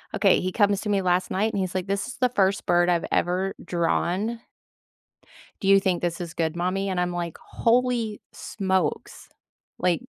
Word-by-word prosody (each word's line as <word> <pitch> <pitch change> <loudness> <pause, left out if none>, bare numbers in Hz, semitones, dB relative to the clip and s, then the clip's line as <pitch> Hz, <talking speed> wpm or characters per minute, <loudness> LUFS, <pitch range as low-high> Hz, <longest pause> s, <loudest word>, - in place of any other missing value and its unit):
okay, 195 -1 +4
he 185 - -2
comes 205 -1 +2
to 210 - -4
me 200 -1 +2
last 180 0 +1
night, 215 +4 +1
and 200 - -1
he's 185 -1 -3
like, 185 0 -2
"This 200 0 -1
is 255 - -8
the 250 -1 +2
1st 195 -5 +1
bird 175 0 +3
I've 170 -1 +1
ever 185 +2 0
drawn." 180 +6 0 1.2
"Do 195 - -1
you 195 0 +7
think 185 -2 0
this 175 0 -2
is 170 -1 -6
good, 165 -1 -1
mommy?" 185 +3 -1
And 185 -2 -1
I'm 180 0 -1
like, 175 -2 -4
"Holy 235 -2 0
smokes. 190 -6 -2 0.5
Like, 180 -2 +1
190 Hz, 185 wpm, -25 LUFS, 175-200 Hz, 1.2 s, you